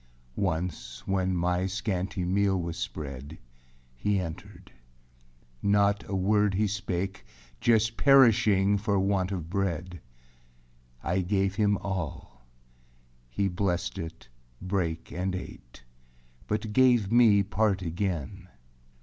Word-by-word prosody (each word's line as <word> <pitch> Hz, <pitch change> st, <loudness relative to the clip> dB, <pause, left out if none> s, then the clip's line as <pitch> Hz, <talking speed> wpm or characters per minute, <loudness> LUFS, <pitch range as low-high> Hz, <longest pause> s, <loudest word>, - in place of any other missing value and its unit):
2. -, -, -4 dB
Once, 80 Hz, -9 st, -3 dB
when 95 Hz, -1 st, 0 dB
my 90 Hz, +1 st, 0 dB
scanty 95 Hz, -2 st, -2 dB
meal 95 Hz, +1 st, +2 dB
was 85 Hz, -1 st, -4 dB
spread, 70 Hz, +1 st, -6 dB, 0.6 s
He 100 Hz, +10 st, 0 dB
entered; 85 Hz, -4 st, -8 dB, 0.9 s
not 100 Hz, 0 st, +2 dB
a 100 Hz, -, -2 dB
word 100 Hz, +1 st, +2 dB
he 105 Hz, +3 st, +2 dB
spake. 95 Hz, -1 st, -3 dB, 0.4 s
Just 115 Hz, -, +2 dB
perishing 105 Hz, -7 st, +5 dB
for 100 Hz, -1 st, +1 dB
want 95 Hz, -1 st, 0 dB
of 90 Hz, -5 st, -4 dB
bread. 90 Hz, -2 st, -3 dB, 1.0 s
I 85 Hz, +4 st, 0 dB
gave 95 Hz, +1 st, 0 dB
him 105 Hz, 0 st, +2 dB
all; 75 Hz, -9 st, -5 dB, 0.8 s
he 100 Hz, +11 st, 0 dB
blessed 90 Hz, -1 st, -2 dB
it, 80 Hz, 0 st, -8 dB, 0.3 s
brake, 90 Hz, -4 st, -2 dB
And 90 Hz, +1 st, -2 dB
ate, 60 Hz, -9 st, -10 dB, 0.6 s
but 105 Hz, 0 st, -2 dB
gave 120 Hz, -5 st, +4 dB
me 115 Hz, -4 st, +6 dB
part 100 Hz, -1 st, 0 dB
again. 90 Hz, +1 st, -3 dB
95 Hz, 115 wpm, -28 LUFS, 90-100 Hz, 1.0 s, me